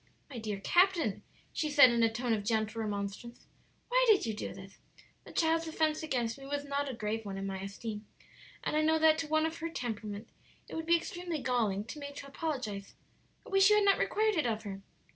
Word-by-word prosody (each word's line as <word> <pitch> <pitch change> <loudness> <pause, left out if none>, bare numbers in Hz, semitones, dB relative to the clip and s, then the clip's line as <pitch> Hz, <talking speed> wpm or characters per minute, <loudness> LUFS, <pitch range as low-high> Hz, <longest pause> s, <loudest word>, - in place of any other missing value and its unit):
"My 245 - -5
dear 210 -3 -4
captain," 345 - +3 0.3
she 305 - -1
said, 285 -4 +8
in 235 0 +2
a 225 -1 +4
tone 240 +1 -1
of 210 -2 -1
gentle 220 +1 0
remonstrance, 205 +3 -5 0.4
"why - - +3
did 425 - +5
you 225 - -1
do 210 - -5
this? 195 +1 -12 0.5
The - - -11
child's 325 0 +1
offence 315 -1 0
against 245 -6 -2
me 270 - -10
was 285 0 -3
not 280 0 -1
a - - -4
grave 220 0 -3
one 195 -2 -5
in 195 - -4
my 195 -1 -4
esteem, 210 +2 -6 0.6
and - - -1
I 305 - +3
know 320 +1 +3
that 315 0 +5
to 325 - -2
one 310 +1 +2
of 320 +1 -3
her 330 0 -3
temperament 220 -6 -5 0.4
it - - -11
would 320 0 -4
be 340 0 +6
extremely 350 -1 -4
galling 225 -7 0
to 230 +7 -8
be 285 - -5
made 285 - -11
to 280 - -7
apologize. 255 -10 -4 0.5
I - - -11
wish 390 +1 +6
you 420 - +6
had 420 -1 +4
not 395 - +5
required 435 0 +2
it 300 - +2
of 220 -1 -2
her." 195 -2 -6
255 Hz, 225 wpm, -32 LUFS, 215-320 Hz, 0.6 s, said